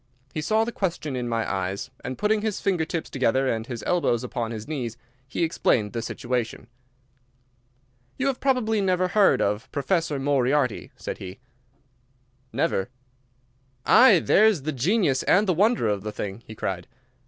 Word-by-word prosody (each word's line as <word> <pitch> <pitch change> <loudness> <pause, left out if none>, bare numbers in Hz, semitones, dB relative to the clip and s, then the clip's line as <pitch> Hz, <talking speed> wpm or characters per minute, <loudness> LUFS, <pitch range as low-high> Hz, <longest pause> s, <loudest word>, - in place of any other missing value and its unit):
He 155 - -2
saw 220 +7 +2
the 235 - -3
question 170 - -3
in 120 -1 -3
my 115 -1 -1
eyes, 95 +5 -3
and, 130 +1 -5
putting 210 0 +1
his 215 -2 -2
finger 180 -5 0
tips 165 0 -3
together 130 0 +1
and 115 -2 -1
his 120 -3 -6
elbows 165 -10 +1
upon 120 -2 -3
his 110 -2 -6
knees, 125 -7 -4 0.3
he 135 - -2
explained 115 -9 +1
the 115 - -2
situation. 120 0 -3 1.5
"You 270 - -1
have 270 -2 0
probably 235 -6 +1
never 185 -1 +1
heard 200 +1 +4
of 105 +2 -2
Professor 160 0 0
Moriarty?" 135 -2 +1
said - - -6
he. 95 0 -8 1.1
"Never." 100 - 0 1.0
"Aye, 240 -6 +7
there's 210 -8 +4
the 155 - -1
genius 150 - +1
and 200 +4 +3
the 185 - +2
wonder 210 - +2
of 105 -2 0
the 105 +1 -5
thing!" 105 +1 -5
he 110 - -9
cried. 90 -4 -4
140 Hz, 160 wpm, -25 LUFS, 115-190 Hz, 1.5 s, Aye